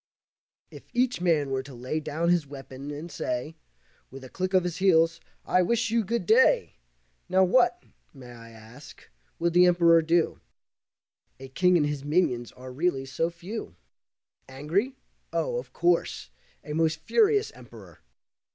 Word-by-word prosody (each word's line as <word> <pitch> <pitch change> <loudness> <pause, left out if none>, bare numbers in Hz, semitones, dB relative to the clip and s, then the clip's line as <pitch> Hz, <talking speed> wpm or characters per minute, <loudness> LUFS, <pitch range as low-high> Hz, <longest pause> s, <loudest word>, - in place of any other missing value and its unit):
If - - -13
each 250 -5 0
man 155 -6 +1
were 135 0 -1
to 135 -1 -12
lay 125 +6 -3
down 155 +2 -2
his 175 -4 +2
weapon, 135 0 -9
and 150 +4 -7
say, 130 +3 -4 0.5
With 135 0 -11
a 130 - -10
click 185 +4 -3
of 185 - +4
his 175 -1 -4
heels, 165 -3 +3 0.3
"I 185 - +2
wish 235 +5 0
you 230 0 +2
Good 235 +4 -2
day," 465 +2 +3 0.5
Now 190 +1 +4
what, 255 - +2 0.3
may 125 -4 -13
I 115 -1 -13
ask, 115 +5 -15 0.3
could 170 0 0
the 180 +1 +6
Emperor 170 -1 +5
do? 165 +1 +1 1.0
A 135 0 -10
king 180 +6 +3
and 150 - +2
his 145 -2 -3
minions 145 -6 0
are 130 0 -11
really 140 -2 -1
so 135 +5 -2
few. 175 - -8 0.7
Angry? 165 - -2 0.4
Oh, - - -1
of - - -7
course, 170 - 0 0.3
a 150 - -6
most 160 0 +1
furious 425 - +2
Emperor! - - -15
165 Hz, 155 wpm, -26 LUFS, 135-185 Hz, 1.0 s, the